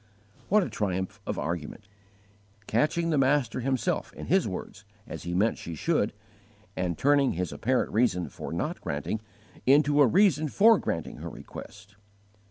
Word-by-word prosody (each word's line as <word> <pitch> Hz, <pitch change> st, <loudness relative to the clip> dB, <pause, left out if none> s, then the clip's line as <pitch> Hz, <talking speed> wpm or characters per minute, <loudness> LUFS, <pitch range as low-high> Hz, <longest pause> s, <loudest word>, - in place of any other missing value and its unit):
What 210 Hz, +1 st, +5 dB
a -, -, -4 dB
triumph 95 Hz, +1 st, -2 dB
of -, -, -2 dB
argument! 85 Hz, +5 st, -4 dB, 0.8 s
Catching 155 Hz, +10 st, +1 dB
the 150 Hz, -, +2 dB
Master 135 Hz, -3 st, +2 dB
Himself 130 Hz, -1 st, -1 dB
in -, -, -8 dB
His -, -, +2 dB
words, -, -, -7 dB, 0.2 s
as 80 Hz, -, -7 dB
He 85 Hz, 0 st, -2 dB
meant 105 Hz, +5 st, +2 dB
she 85 Hz, -, -6 dB
should, 150 Hz, -, +1 dB, 0.6 s
and 90 Hz, -3 st, -2 dB
turning 140 Hz, -1 st, +3 dB
His 90 Hz, -1 st, -3 dB
apparent 130 Hz, +2 st, 0 dB
reason 105 Hz, -6 st, +2 dB
for -, -, -8 dB
not -, -, -3 dB
granting 75 Hz, +9 st, -3 dB, 0.5 s
into 145 Hz, +2 st, +5 dB
a 140 Hz, -, +7 dB
reason 165 Hz, -, +3 dB
for 220 Hz, +7 st, +5 dB
granting 80 Hz, -, -3 dB
her -, -, -6 dB
request! 105 Hz, +1 st, -11 dB
115 Hz, 155 wpm, -28 LUFS, 90-145 Hz, 0.8 s, a